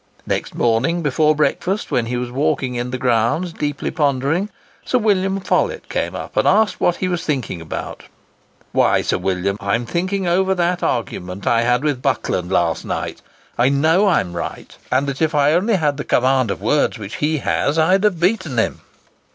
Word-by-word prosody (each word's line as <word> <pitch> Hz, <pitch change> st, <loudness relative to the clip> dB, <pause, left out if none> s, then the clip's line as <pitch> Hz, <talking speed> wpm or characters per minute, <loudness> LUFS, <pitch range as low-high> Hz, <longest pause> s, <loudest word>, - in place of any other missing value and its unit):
Next -, -, -3 dB
morning, 130 Hz, +9 st, +1 dB
before 150 Hz, +2 st, +2 dB
breakfast, 185 Hz, +6 st, -1 dB
when 115 Hz, -2 st, +1 dB
he 125 Hz, +1 st, -2 dB
was 120 Hz, 0 st, -4 dB
walking 135 Hz, -1 st, 0 dB
in 120 Hz, 0 st, -3 dB
the 130 Hz, -, -3 dB
grounds, 125 Hz, +8 st, +1 dB
deeply 145 Hz, -2 st, -3 dB
pondering, 145 Hz, +5 st, 0 dB, 0.3 s
Sir 255 Hz, -, +1 dB
William 195 Hz, -4 st, +1 dB
Follett 185 Hz, -, -1 dB
came -, -, -2 dB
up -, -, -7 dB
and -, -, +2 dB
asked 220 Hz, 0 st, +3 dB
what 175 Hz, -, +3 dB
he 185 Hz, -, -2 dB
was 175 Hz, -2 st, -2 dB
thinking 130 Hz, -, -2 dB
about? 80 Hz, -, -6 dB, 0.7 s
"Why, -, -, +3 dB
Sir -, -, 0 dB
William, 95 Hz, +1 st, -1 dB
I 100 Hz, +2 st, 0 dB
am 120 Hz, +1 st, -2 dB
thinking 185 Hz, +8 st, -1 dB
over 190 Hz, +2 st, +2 dB
that 175 Hz, 0 st, 0 dB
argument 95 Hz, -5 st, -3 dB
I 115 Hz, -1 st, +3 dB
had 125 Hz, +3 st, +1 dB
with 145 Hz, -4 st, -1 dB
Buckland 115 Hz, -9 st, -1 dB
last 85 Hz, -3 st, +1 dB
night; -, -, -4 dB, 0.4 s
I 125 Hz, +2 st, +4 dB
know 160 Hz, +8 st, +3 dB
I 190 Hz, -, +4 dB
am 90 Hz, -2 st, -7 dB
right, 85 Hz, -, -6 dB, 0.2 s
and 130 Hz, +2 st, +2 dB
that 140 Hz, +1 st, -4 dB
if 160 Hz, -1 st, +1 dB
I 145 Hz, 0 st, +4 dB
had 160 Hz, -, +4 dB
only 210 Hz, +4 st, +1 dB
the 145 Hz, -3 st, 0 dB
command 130 Hz, -2 st, +2 dB
of -, -, -4 dB
words 145 Hz, -3 st, +1 dB
which 105 Hz, -1 st, -7 dB
he 155 Hz, +1 st, 0 dB
has, 145 Hz, +1 st, 0 dB
I'd 185 Hz, +5 st, +3 dB
have 205 Hz, -6 st, +2 dB
beaten 180 Hz, -, 0 dB
him." 110 Hz, -, 0 dB
145 Hz, 190 wpm, -19 LUFS, 120-175 Hz, 0.7 s, I